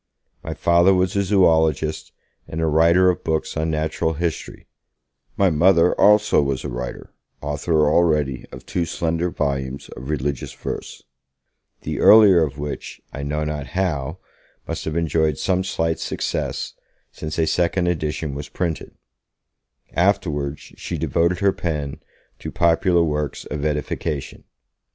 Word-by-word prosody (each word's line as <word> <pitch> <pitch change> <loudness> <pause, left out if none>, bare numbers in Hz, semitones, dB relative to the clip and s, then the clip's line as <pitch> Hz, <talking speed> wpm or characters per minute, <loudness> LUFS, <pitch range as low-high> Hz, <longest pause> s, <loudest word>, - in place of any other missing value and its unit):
My - - -5
Father 85 +3 +4
was 90 +1 +1
a 100 - +3
zoologist, 80 -6 +2 0.4
and 80 - -5
a 80 - +1
writer 85 +4 +4
of 90 - -7
books 80 -1 -1
on 80 +1 -1
natural 80 +1 -1
history; 85 +1 -4 0.7
my 95 -2 +3
Mother 85 +2 +4
also 105 -4 +4
was 70 -2 -2
a 75 - -4
writer, 60 0 -6 0.3
author 75 +2 0
already 75 -5 +1
of 65 - -11
two 85 - -1
slender 85 +1 -1
volumes 70 -3 -3
of 65 +3 -9
religious 70 -3 -2
verse - - -6 0.8
the - - -4
earlier 105 -5 +7
of 70 -3 -4
which, 75 0 -6
I 70 - -5
know 75 +2 -2
not 75 -2 -4
how, 80 -4 -1 0.5
must - - -4
have 80 +1 -2
enjoyed 80 -3 +1
some 95 0 0
slight 80 -3 -1
success, - - -3 0.4
since 80 0 -6
a 80 - +2
second 90 +2 +1
edition 80 -3 -2
was 70 +1 -6
printed 85 -3 -4 1.0
afterwards 75 -6 0 0.2
she - - -4
devoted 85 +2 0
her 100 -1 +3
pen 75 -5 -3 0.4
to - - -6
popular 85 +1 +3
works 75 -2 -2
of 75 -1 -5
edification. 75 0 -3
80 Hz, 140 wpm, -22 LUFS, 75-85 Hz, 1.0 s, earlier